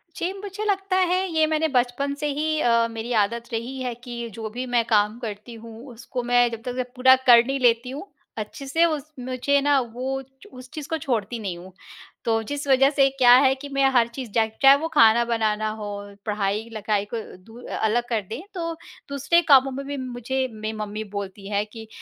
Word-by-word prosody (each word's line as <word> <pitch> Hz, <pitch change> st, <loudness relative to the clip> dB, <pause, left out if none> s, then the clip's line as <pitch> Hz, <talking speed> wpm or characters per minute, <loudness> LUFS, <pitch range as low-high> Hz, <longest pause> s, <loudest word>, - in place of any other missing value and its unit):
जी, 350 Hz, -, -2 dB
मुझे 405 Hz, +1 st, -6 dB
लगता 390 Hz, -2 st, 0 dB, 0.2 s
है 370 Hz, +1 st, +1 dB
ये 315 Hz, 0 st, +4 dB
मैंने 315 Hz, 0 st, +1 dB
बचपन 250 Hz, +3 st, +1 dB
से 295 Hz, +1 st, -3 dB
ही 310 Hz, +2 st, -1 dB
अ, 230 Hz, -1 st, +3 dB
मेरी 225 Hz, +2 st, -4 dB
आदत 235 Hz, +4 st, -3 dB
रही 240 Hz, +4 st, -4 dB
है 250 Hz, -1 st, -2 dB
कि 235 Hz, -2 st, -6 dB
जो 220 Hz, +1 st, -6 dB
भी 245 Hz, +4 st, -5 dB
मैं 235 Hz, -, +4 dB
काम 210 Hz, 0 st, +2 dB
करती 215 Hz, 0 st, -7 dB
हूँ, 230 Hz, +1 st, -11 dB
उसको 245 Hz, +2 st, -6 dB
मैं 245 Hz, 0 st, +3 dB
जब 230 Hz, -1 st, -6 dB
तक 250 Hz, 0 st, -4 dB
पूरा 260 Hz, +1 st, +6 dB
कर 235 Hz, -1 st, +8 dB
नहीं 270 Hz, +2 st, -2 dB
लेती 240 Hz, 0 st, +2 dB
हूँ 285 Hz, +9 st, -7 dB, 0.3 s
अच्छे 215 Hz, +6 st, -6 dB
से 325 Hz, +5 st, +3 dB
उस 310 Hz, -2 st, -3 dB
मुझे 255 Hz, +3 st, 0 dB
ना 285 Hz, 0 st, +3 dB
वो 255 Hz, +2 st, -4 dB
च 265 Hz, 0 st, -19 dB
उस 255 Hz, 0 st, -11 dB
चीज़ 300 Hz, -2 st, -6 dB
को 320 Hz, -, -1 dB
छोड़ती 235 Hz, -5 st, -2 dB
नहीं 190 Hz, -5 st, -4 dB
हूँ। 180 Hz, +2 st, -12 dB, 0.5 s
तो 225 Hz, -1 st, +1 dB
जिस 285 Hz, +5 st, -5 dB
वजह 270 Hz, 0 st, +5 dB
से 275 Hz, -2 st, +3 dB
क्या 245 Hz, -2 st, +7 dB
है 265 Hz, -, +5 dB
कि 285 Hz, +1 st, -9 dB
मैं 275 Hz, 0 st, +2 dB
हर 235 Hz, -2 st, +5 dB
चीज़ 235 Hz, 0 st, -7 dB
जाए 220 Hz, 0 st, +1 dB
चाहे 275 Hz, 0 st, +8 dB
वो 325 Hz, -, -1 dB
खाना 230 Hz, -3 st, +6 dB
बनाना 215 Hz, -2 st, 0 dB
हो, 205 Hz, -2 st, -7 dB
पढ़ाई-लिखाई 210 Hz, 0 st, -1 dB
को -, -, -1 dB, 0.3 s
दू 225 Hz, +4 st, -14 dB
अ -, -, -5 dB
अलग 220 Hz, +2 st, +1 dB
कर 225 Hz, -3 st, 0 dB
दें, 230 Hz, +6 st, -5 dB
तो 335 Hz, -3 st, -3 dB, 0.4 s
दूसरे 280 Hz, +5 st, +2 dB
कामों 270 Hz, -1 st, +6 dB
में 275 Hz, +1 st, -6 dB
भी 285 Hz, 0 st, -4 dB
मुझे 260 Hz, 0 st, -3 dB
मेरी 215 Hz, 0 st, -5 dB
मम्मी 210 Hz, 0 st, -4 dB
बोलती 200 Hz, 0 st, -6 dB
है 205 Hz, 0 st, 0 dB
कि 220 Hz, +1 st, -11 dB
245 Hz, 210 wpm, -24 LUFS, 220-275 Hz, 0.5 s, कर